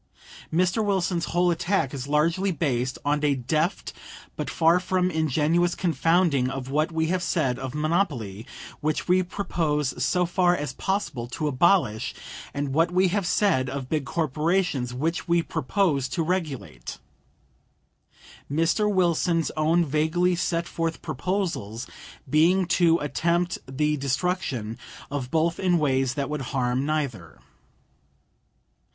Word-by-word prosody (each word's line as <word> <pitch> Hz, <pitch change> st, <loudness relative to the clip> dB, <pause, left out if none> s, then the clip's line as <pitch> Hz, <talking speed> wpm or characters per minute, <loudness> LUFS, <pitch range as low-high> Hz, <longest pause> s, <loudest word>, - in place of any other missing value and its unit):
Mr. 185 Hz, +6 st, +2 dB
Wilson's 180 Hz, -4 st, 0 dB
whole 175 Hz, +1 st, +2 dB
attack 170 Hz, -4 st, 0 dB
is 135 Hz, -1 st, -5 dB
largely 165 Hz, +6 st, +2 dB
based 130 Hz, -6 st, -1 dB
on 145 Hz, +1 st, +1 dB
a 145 Hz, -1 st, +3 dB
deft 155 Hz, -, -1 dB, 0.4 s
but -, -, -4 dB
far 165 Hz, +2 st, +3 dB
from 185 Hz, 0 st, 0 dB
ingenuous 160 Hz, +2 st, +1 dB
confounding 165 Hz, -4 st, +2 dB
of 135 Hz, 0 st, -5 dB
what 155 Hz, +4 st, +1 dB
we 160 Hz, 0 st, 0 dB
have 185 Hz, 0 st, 0 dB
said 135 Hz, -9 st, 0 dB
of 130 Hz, +1 st, -5 dB
monopoly, 150 Hz, -, -1 dB, 0.3 s
which 155 Hz, +1 st, -1 dB
we 185 Hz, +1 st, +4 dB
propose 155 Hz, -8 st, -1 dB
so 180 Hz, +6 st, +2 dB
far 175 Hz, 0 st, +2 dB
as 145 Hz, -2 st, -4 dB
possible 190 Hz, -, -2 dB
to 150 Hz, +5 st, -3 dB
abolish, 130 Hz, -, +2 dB, 0.4 s
and 140 Hz, -1 st, -3 dB
what 165 Hz, +4 st, +3 dB
we 185 Hz, +1 st, +3 dB
have 195 Hz, -1 st, -1 dB
said 155 Hz, -11 st, +2 dB
of 135 Hz, -1 st, -5 dB
big 155 Hz, -3 st, 0 dB
corporations, 155 Hz, -1 st, 0 dB
which 160 Hz, +9 st, -2 dB
we 170 Hz, 0 st, +3 dB
propose 145 Hz, -4 st, 0 dB
to 170 Hz, -, -1 dB
regulate; 140 Hz, -, -4 dB, 1.5 s
Mr. 165 Hz, +8 st, +2 dB
Wilson's 170 Hz, -3 st, +1 dB
own 160 Hz, +3 st, +2 dB
vaguely 160 Hz, +5 st, +1 dB
set 170 Hz, -1 st, -1 dB
forth 165 Hz, -1 st, -3 dB
proposals 145 Hz, -, -3 dB, 0.4 s
being 165 Hz, +7 st, +4 dB
to 170 Hz, -1 st, +3 dB
attempt 170 Hz, +6 st, 0 dB
the 150 Hz, +3 st, 0 dB
destruction 135 Hz, -, -2 dB, 0.3 s
of 135 Hz, -3 st, -3 dB
both 165 Hz, +2 st, +1 dB
in 180 Hz, -2 st, +2 dB
ways 135 Hz, -4 st, +1 dB
that 140 Hz, -1 st, -1 dB
would 150 Hz, -1 st, -3 dB
harm 130 Hz, 0 st, -1 dB
neither. 135 Hz, -, -3 dB
160 Hz, 135 wpm, -25 LUFS, 135-175 Hz, 1.5 s, we